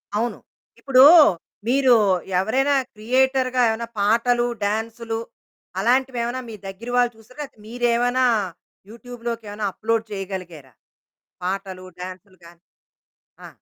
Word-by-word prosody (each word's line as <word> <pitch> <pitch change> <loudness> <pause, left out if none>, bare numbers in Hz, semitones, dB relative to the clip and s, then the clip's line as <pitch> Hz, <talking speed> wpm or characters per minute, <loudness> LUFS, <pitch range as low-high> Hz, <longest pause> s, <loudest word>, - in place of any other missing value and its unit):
అవును. 230 +3 -1 0.4
ఇప్పుడు 265 -1 +5 0.6
మీరు 260 0 +4 0.5
ఎవరైనా 265 +8 +1 0.2
క్రియేటర్‌గా 255 +3 +1
ఏమైనా 230 +1 -3
పాటలు, 235 +4 +2 0.2
డాన్సులు 225 +2 -3 0.6
అలాంటివి 255 +3 +1
ఏమైనా 245 +2 -3
మీ 220 - -7
దగ్గిర 195 +5 -8
వాళ్ళు 245 -1 +3
చూశారా? 240 +6 -18
లేతె 265 - -12
మీరేమైనా 245 +2 +1 0.7
యూట్యూబ్‌లోకి 235 -1 -7
ఏమైనా 205 0 -3
అప్‌లోడ్ 225 0 -1
చేయగలిగారా 185 - -7 0.7
పాటలు, 190 0 -4 0.2
డాన్సులు 185 +1 -10
గాని? 170 +1 -17 0.8
ఆ! - - -8
230 Hz, 105 wpm, -22 LUFS, 200-245 Hz, 0.8 s, ఇప్పుడు